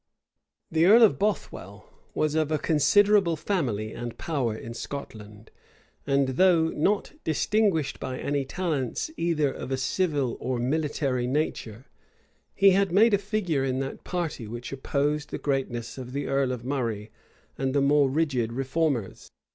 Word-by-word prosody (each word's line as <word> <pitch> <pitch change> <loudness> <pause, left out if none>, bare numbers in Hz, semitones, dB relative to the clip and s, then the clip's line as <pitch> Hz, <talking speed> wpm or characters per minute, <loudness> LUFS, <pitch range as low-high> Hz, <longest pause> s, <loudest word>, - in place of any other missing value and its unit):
The 160 +1 +3
earl 230 +4 +8
of 220 - +4
Bothwell 205 0 -3 0.3
was 155 -1 +1
of 155 -1 0
a 155 - +2
considerable 175 +5 +3
family 120 - -2
and 120 -1 -6
power 130 -9 -2
in 115 +1 -8
Scotland; 110 -4 -8 0.6
and 140 -1 +2
though 165 +3 +4
not 195 +8 0
distinguished 165 -1 +1
by 130 - -4
any 140 +1 -1
talents 150 - -2
either 155 -4 +1
of - - -7
a 135 - -1
civil 140 -2 0
or 130 -1 -2
military 135 -1 -1
nature, 130 -4 -3 0.7
he 195 0 +6
had 195 -1 +2
made 215 +5 +5
a 200 - +4
figure 195 -8 -1
in 130 -1 -1
that 135 - -6
party 165 - -3
which 120 +2 -7
opposed 145 +2 -1
the - - -4
greatness 130 -4 -3
of 125 0 -8
the 140 +1 -2
earl 135 -1 +1
of 125 -1 -5
Murray 115 -6 -3 0.4
and 135 0 -2
the - - +4
more 140 0 +4
rigid 135 -6 0
reformers. 135 -3 -2
140 Hz, 150 wpm, -26 LUFS, 125-165 Hz, 0.7 s, earl